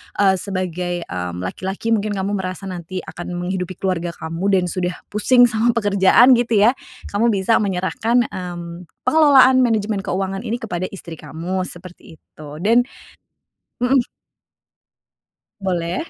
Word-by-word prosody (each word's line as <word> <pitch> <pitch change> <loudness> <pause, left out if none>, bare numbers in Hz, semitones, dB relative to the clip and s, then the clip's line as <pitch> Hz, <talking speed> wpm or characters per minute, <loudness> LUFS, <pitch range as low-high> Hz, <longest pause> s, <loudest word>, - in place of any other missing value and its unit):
eee, 195 -2 +4
sebagai, 180 -2 -3
mmm, 90 - -5
laki-laki, 190 - -4
mungkin 210 -2 0
kamu 195 +1 -2
merasa 185 0 -5
nanti 180 +1 -6
akan 175 +1 -7
menghidupi 185 0 -3
keluarga 175 -2 -2
kamu 165 +4 -4
dan 190 -2 +3
sudah 180 -1 -2 0.2
pusing 245 +4 +4
sama 235 0 +2
pekerjaan 205 +3 +5
gitu 230 -4 +2
ya, 230 - +6 0.4
kamu 210 +4 +2
bisa 195 +4 +2
menyerahkan, 210 +5 0
mmm, 175 -1 -7 0.2
pengelolaan 275 -5 +6
manajemen 220 -4 +1
keuangan 195 0 -2
ini 230 +2 -3
kepada 185 -6 -4
istri 170 -5 -10
kamu, 175 +5 -4
seperti 175 -2 -12
itu. 155 -1 -15 0.2
Dan 235 +4 +3 1.0
mhm. 260 +2 +4 1.6
Boleh. 180 - -2
190 Hz, 130 wpm, -20 LUFS, 175-220 Hz, 1.6 s, ya